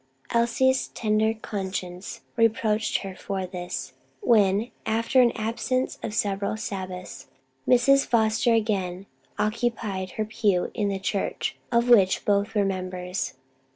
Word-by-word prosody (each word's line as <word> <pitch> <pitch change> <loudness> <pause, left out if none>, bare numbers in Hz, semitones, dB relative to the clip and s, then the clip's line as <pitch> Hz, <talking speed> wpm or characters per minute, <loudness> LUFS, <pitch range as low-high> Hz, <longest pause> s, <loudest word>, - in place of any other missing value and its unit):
Elsie's 240 +3 +2
tender 220 0 +1
conscience 190 0 -5
reproached 220 -2 +1
her 190 -1 -6
for 190 0 -3
this, 180 -1 -5 0.3
when 215 - +3
after 230 +4 +3
an 240 -1 +5
absence 235 +4 -2
of 210 - -4
several 200 0 0
Sabbaths 185 -4 -6 0.4
Mrs. 275 +3 +5
Foster 225 +1 +2
again 195 -4 -1 0.3
occupied 210 -3 -1
her 215 - -2
pew 210 -4 +1
in 210 - 0
the 200 -1 -1
church 195 +1 -2 0.2
of 235 0 +3
which 200 -6 +5
both 205 +2 +1
were 205 -1 +3
members. 185 -1 -3
210 Hz, 120 wpm, -26 LUFS, 190-230 Hz, 0.4 s, an